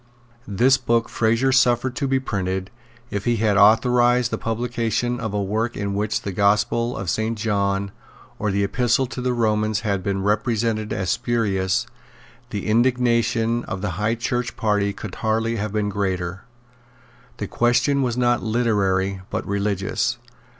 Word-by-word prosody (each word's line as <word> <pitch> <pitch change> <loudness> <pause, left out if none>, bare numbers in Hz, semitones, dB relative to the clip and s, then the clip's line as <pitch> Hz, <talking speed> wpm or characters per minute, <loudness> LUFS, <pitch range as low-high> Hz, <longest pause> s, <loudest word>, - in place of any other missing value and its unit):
This 125 +7 +3
book 115 -2 0
Fraser 115 +4 +1
suffered 125 -1 +3
to 140 - 0
be 135 0 +2
printed. 95 -5 -3 0.4
If 100 -1 -3
he 120 - +2
had 110 -2 +1
authorised 120 +3 +4
the - - -1
publication 120 +1 -1
of 110 -3 -3
a 100 0 -1
work 110 +4 -2
in 100 -1 -2
which 105 +2 -1
the 100 - -3
Gospel 105 +5 +1
of 95 - -5
Saint 110 +6 -1
John 100 -2 0 0.5
or 105 - 0
the 100 +1 +1
Epistle 120 +5 +1
to 125 0 -6
the 125 0 0
Romans 110 -3 +1
had 100 -3 -1
been 95 0 -2
represented 110 +1 0
as 95 -1 -1
spurious, 105 -3 0 0.6
the 105 -4 -4
indignation 115 0 +2
of 95 - -5
the 100 - -1
High 105 +6 0
Church 120 +1 -2
party 105 -2 +1
could 100 - -8
hardly 115 +1 0
have 105 0 -3
been 105 -1 -1
greater. 95 -3 -3 0.9
The - - -3
question 125 +4 +2
was 125 -2 -1
not 120 -1 +2
literary, 100 -5 0
but - - -3
religious. 100 +3 -1
110 Hz, 155 wpm, -22 LUFS, 100-120 Hz, 0.9 s, authorised